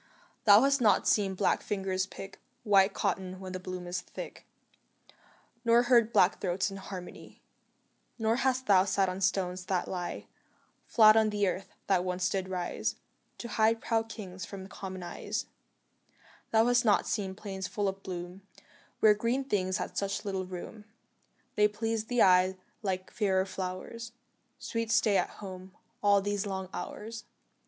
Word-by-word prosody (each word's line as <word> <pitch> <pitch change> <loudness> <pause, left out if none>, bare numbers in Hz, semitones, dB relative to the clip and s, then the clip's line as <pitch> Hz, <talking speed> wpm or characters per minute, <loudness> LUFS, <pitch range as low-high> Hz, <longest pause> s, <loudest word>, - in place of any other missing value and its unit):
Thou 205 0 +8
hast 275 -1 +3
not 210 -4 +4
seen 195 -3 +2
black 190 0 +1
fingers 190 -2 -2
pick 195 +1 -10 0.2
White 200 -2 +5
cotton 185 -1 -2
when 190 -1 -7
the 185 - -4
bloom 185 -1 -6
is 180 0 -3
thick, - - -9 1.2
Nor 235 0 +5
heard 240 -2 +4
black 185 -3 +3
throats 190 +2 0
in 195 - -7
harmony; 190 -2 -9 0.7
Nor 225 0 +1
hast 260 0 +1
thou 190 -3 +6
sat 195 -1 +1
on 185 +1 -5
stones 185 -1 0
that 185 -2 -1
lie 180 -2 -4 0.6
Flat 215 -1 +7
on 220 -1 +4
the 205 -1 +1
earth, 185 +1 -4
that 185 -3 +2
once 180 0 -1
did 190 -1 -2
rise 180 -2 -2 0.4
To 235 - -6
hide 225 +1 +2
proud 225 -1 -1
kings 190 -5 -8
from 195 -1 -7
common 190 -2 -7
eyes, 175 - -4 1.0
Thou 225 0 +4
hast 245 0 +3
not 210 -3 +3
seen 190 -2 -2
plains 195 -2 -5
full 205 +1 -1
of 195 0 -3
bloom 180 0 -7 0.6
Where 215 -1 +7
green 235 +6 0
things 190 -6 0
had - - -5
such 200 0 -2
little 190 -2 -2
room 190 +4 -8 0.7
They 210 0 +5
pleased 220 +1 -2
the 245 0 +3
eye 185 0 +4 0.2
like 185 -3 -3
fairer 190 -3 +1
flowers 195 +5 -6 0.4
Sweet 230 -1 -3
Stay 220 -2 +3
at - - +1
Home, 185 -1 -9 0.3
all 200 -1 +4
these 205 0 -1
long 190 -1 -4
hours. 225 +1 -6
195 Hz, 160 wpm, -30 LUFS, 185-220 Hz, 1.2 s, Thou